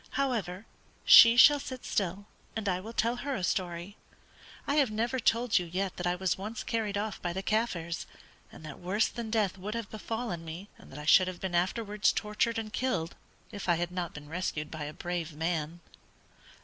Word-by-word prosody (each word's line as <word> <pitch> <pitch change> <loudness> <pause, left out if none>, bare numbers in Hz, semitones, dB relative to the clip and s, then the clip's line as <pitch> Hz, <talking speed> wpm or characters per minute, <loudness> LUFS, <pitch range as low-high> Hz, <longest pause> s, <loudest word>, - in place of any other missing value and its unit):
However, 220 -8 -1 0.4
she 230 +1 +10
shall 290 +3 +8
sit 260 -2 -7
still, 195 0 -2 0.3
and 220 -2 -3
I 180 -2 +1
will 215 +5 -8
tell 235 +1 0
her 275 +2 -3
a 185 - -4
story. 175 +2 -2 0.7
I 285 - 0
have 280 -5 +4
never 235 +4 -1
told 230 -3 +2
you 175 - -5
yet 185 +2 -3
that 175 - -2
I 175 - +1
was 185 0 -1
once 215 +3 -5
carried 215 -3 -1
off 210 -1 -3
by 175 -1 -2
the 190 +2 -4
Kaffirs, 190 -6 -1 0.4
and 160 - -12
that 145 -3 -9
worse 200 +5 +1
than 235 -2 -6
death 210 -4 0
would 210 +4 -5
have 230 -3 -5
befallen 220 -4 -4
me, 170 +5 -8
and - - -15
that 135 - -9
I 150 - -7
should 185 +4 +6
have 185 -1 -5
been 190 -2 -4
afterwards 205 +3 +1
tortured 210 +2 -1
and 220 -1 -5
killed, 250 -11 -1 0.4
if 200 -2 -5
I 175 - +5
had 175 +1 -2
not 180 -2 -3
been 150 0 -9
rescued 155 -2 -3
by 155 -2 -5
a 150 - -5
brave 175 -1 -4
man." 165 +1 -2
195 Hz, 200 wpm, -30 LUFS, 175-225 Hz, 0.7 s, she